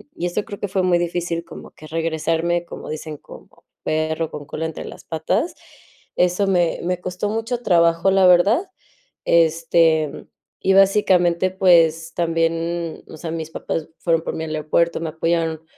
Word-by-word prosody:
y 175 - -3
eso 175 +4 -1
creo 200 - -8
que 205 - -2
fue 190 0 0
muy 180 -1 +3
difícil, 170 -1 -2
como - - -11
que 155 - -14
regresarme, 165 +1 -1
como - - -9
dicen: 155 -1 -6
"Como - - -14 0.3
perro 155 +1 -1
con 145 -1 -7
cola 160 +3 -4
entre 160 - -6
las - - -10
patas". 160 - -1 0.6
Eso 180 +3 +2
me 175 -3 +1
me 180 0 -1
costó 180 +3 -3
mucho 225 +3 -2
trabajo, 170 0 +3
la 190 -1 +5
verdad. 200 - +4 0.6
Este, 165 -2 +2 0.3
y 190 - +2
básicamente, 185 -3 +4
pues, 165 -4 +3
también, 165 0 -1
o 155 - -11
sea, 160 0 -6
mis 160 -1 -4
papás 160 -1 -4
fueron 165 -1 +1
por - - -4
mí 160 - -4
al 155 -1 -4
aeropuerto, 165 +3 +1
me 165 - -3
apoyaron. 165 0 -1
170 Hz, 165 wpm, -21 LUFS, 160-180 Hz, 0.6 s, la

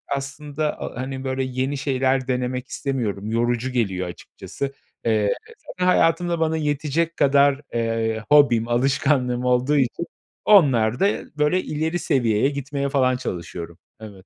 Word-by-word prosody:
aslında 145 +2 -4
a 125 - -5
hani, 130 0 -5
böyle, 130 0 -1
yeni 130 +2 -2
şeyler 135 -1 0
denemek 125 0 -2
istemiyorum, 110 -9 -3
yorucu 120 +2 0
geliyor 95 -7 -1
açıkçası. 135 +9 -7 0.3
Eee, 110 -3 +2 0.3
zaten 180 0 -3
hayatımda 170 -1 +2
bana 160 0 +1
yetecek 155 +2 -1
kadar, 140 0 +4
eee, 115 -1 -1
hobim, 130 -6 +5
alışkanlığım 125 0 +1
olduğu 125 +4 +2
için 135 +5 0 0.4
onlarda, 135 - +4 0.3
böyle, 150 +5 +2
ileri 160 +3 -2
seviyeye 125 -5 +2
gitmeye 140 0 -3
falan 130 -2 +2
çalışıyorum. 85 -6 -6 0.2
Evet. 100 -4 -11
130 Hz, 125 wpm, -22 LUFS, 120-145 Hz, 0.4 s, hobim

